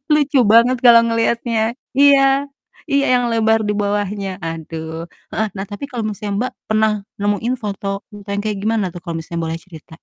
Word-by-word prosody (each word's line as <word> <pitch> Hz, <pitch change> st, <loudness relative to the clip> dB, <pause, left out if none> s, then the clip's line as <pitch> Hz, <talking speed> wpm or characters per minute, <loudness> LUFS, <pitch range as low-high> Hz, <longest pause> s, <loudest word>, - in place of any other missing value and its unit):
lucu 290 Hz, -2 st, +3 dB
banget 240 Hz, +3 st, +6 dB
kalau 235 Hz, -1 st, +9 dB
ngelihatnya, 230 Hz, 0 st, 0 dB, 0.4 s
iya 280 Hz, -1 st, +7 dB, 0.7 s
iya 280 Hz, 0 st, +3 dB
yang 245 Hz, 0 st, +2 dB
lebar 225 Hz, 0 st, +3 dB
di -, -, +2 dB
bawahnya, 205 Hz, -1 st, -1 dB, 0.2 s
aduh 160 Hz, 0 st, -6 dB, 0.4 s
heeh, 220 Hz, -, 0 dB
nah 195 Hz, -, -3 dB
tapi 205 Hz, +7 st, -6 dB
kalau 240 Hz, -3 st, -3 dB
misalnya, 205 Hz, 0 st, -4 dB
Mbak, 255 Hz, +2 st, -2 dB, 0.2 s
pernah 220 Hz, 0 st, +3 dB, 0.3 s
nemuin 205 Hz, +5 st, 0 dB
foto 200 Hz, -1 st, -4 dB, 0.3 s
e 205 Hz, -1 st, -11 dB
yang 200 Hz, -, -1 dB
kayak 210 Hz, -2 st, -2 dB
gimana 220 Hz, -1 st, +1 dB
tuh 175 Hz, -, -8 dB
kalau 170 Hz, -, -4 dB
misalnya 170 Hz, +1 st, -5 dB
boleh 165 Hz, 0 st, -3 dB
cerita? 160 Hz, -3 st, -13 dB
215 Hz, 175 wpm, -19 LUFS, 195-235 Hz, 0.7 s, kalau